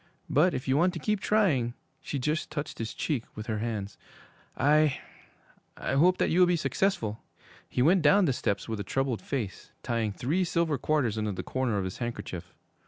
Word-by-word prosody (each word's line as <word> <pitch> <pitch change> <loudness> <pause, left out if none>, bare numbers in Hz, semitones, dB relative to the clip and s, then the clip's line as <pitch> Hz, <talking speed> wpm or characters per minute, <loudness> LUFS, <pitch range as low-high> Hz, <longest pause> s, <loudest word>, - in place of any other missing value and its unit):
But 175 +6 +4
if 130 - -4
you 130 +1 +3
want 175 +3 +3
to 170 - -4
keep 210 +6 0
trying,' 150 - +2 0.3
she 145 - -4
just 150 +4 -1
touched 150 -1 -5
his 115 -1 -4
cheek 140 -8 -1
with 110 - -6
her 110 -2 -2
hands, 105 -3 -4 0.6
'I 150 -1 +3 0.8
I - - -2
hope 175 +7 +4
that - - +1
you 170 - +3
will 180 - +7
be 175 - +3
successful!' 160 - 0 0.5
He 125 - +1
went 175 +5 +5
down 170 +7 +5
the 135 - +2
steps 100 -4 -2
with 110 -2 -3
a - - -2
troubled 130 0 -1
face, 105 -8 -4
tying 115 -3 0
three 150 - 0
silver 165 -5 0
quarters 130 -8 +1
into 105 -1 -1
the - - -5
corner 130 -5 -1
of 100 - 0
his 95 -1 -5
handkerchief. 95 -7 -5
130 Hz, 195 wpm, -28 LUFS, 110-165 Hz, 0.8 s, will